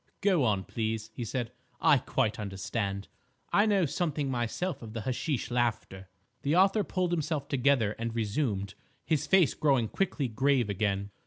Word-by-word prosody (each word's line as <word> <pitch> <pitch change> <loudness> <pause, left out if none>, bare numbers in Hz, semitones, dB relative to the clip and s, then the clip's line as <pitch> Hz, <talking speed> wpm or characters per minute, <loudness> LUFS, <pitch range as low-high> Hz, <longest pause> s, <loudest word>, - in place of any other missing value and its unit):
"Go 190 -8 +3
on, 105 -5 +1
please," 110 +2 -3
he 120 - -5
said, 120 +1 -3 0.3
"I 140 - +5
quite 115 -5 -1
understand. 100 0 -3 0.5
I 205 +2 +5
know 200 -4 +3
something 150 -3 -1
myself 125 +9 -2
of 110 -2 -9
the 115 - -4
hashish 130 +3 -2
laughter." 110 -6 -1 0.3
The 145 +3 +1
author 195 +3 +4
pulled 185 -3 -1
himself 155 -4 -1
together 130 -6 +2
and 115 0 -3
resumed, 105 -3 -1 0.3
his 155 -4 0
face 190 -6 +5
growing 135 -6 +2
quickly 165 -8 -1
grave 125 -1 +1
again. 100 0 -1
125 Hz, 155 wpm, -29 LUFS, 110-155 Hz, 0.5 s, I